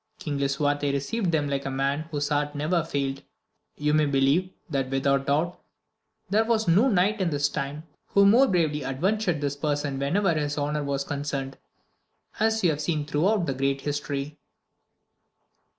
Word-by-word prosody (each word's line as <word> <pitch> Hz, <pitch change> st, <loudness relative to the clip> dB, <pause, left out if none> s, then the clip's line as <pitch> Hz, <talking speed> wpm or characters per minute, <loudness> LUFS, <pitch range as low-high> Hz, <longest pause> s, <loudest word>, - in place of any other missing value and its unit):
King 145 Hz, -3 st, -4 dB
Lisuarte 145 Hz, +1 st, 0 dB
received 170 Hz, +8 st, -1 dB
them 150 Hz, -3 st, +1 dB
like 140 Hz, -1 st, -2 dB
a -, -, -1 dB
man 140 Hz, +3 st, -1 dB
whose 145 Hz, -2 st, -2 dB
heart 145 Hz, 0 st, 0 dB
never 160 Hz, +3 st, 0 dB
failed; 140 Hz, -3 st, -2 dB, 0.6 s
you 150 Hz, 0 st, 0 dB
may 155 Hz, -1 st, +3 dB
believe, 140 Hz, +6 st, +2 dB, 0.2 s
that 135 Hz, -5 st, -2 dB
without 135 Hz, 0 st, +1 dB
doubt, 160 Hz, +5 st, 0 dB, 0.7 s
there 210 Hz, +4 st, +3 dB
was 225 Hz, -1 st, 0 dB
no 195 Hz, +10 st, +5 dB
knight 200 Hz, +1 st, +2 dB
in 180 Hz, -, +1 dB
his 145 Hz, -1 st, +1 dB
time 145 Hz, +1 st, -4 dB, 0.2 s
who 200 Hz, 0 st, +4 dB
more 240 Hz, +7 st, +6 dB
bravely 160 Hz, -, +1 dB
adventured 175 Hz, +4 st, 0 dB
his 145 Hz, 0 st, -1 dB
person 145 Hz, -2 st, -2 dB
whenever 170 Hz, +7 st, +1 dB
his 150 Hz, -1 st, -2 dB
honour 150 Hz, +1 st, -1 dB
was 140 Hz, -1 st, -1 dB
concerned, 140 Hz, -2 st, -4 dB, 0.8 s
as 220 Hz, 0 st, +1 dB
you 175 Hz, -, +4 dB
have 150 Hz, 0 st, -3 dB
seen 150 Hz, -1 st, -1 dB
throughout 175 Hz, +6 st, +1 dB
this 135 Hz, -4 st, -3 dB
great 135 Hz, 0 st, 0 dB
history. 145 Hz, 0 st, -4 dB
145 Hz, 165 wpm, -26 LUFS, 140-175 Hz, 0.8 s, more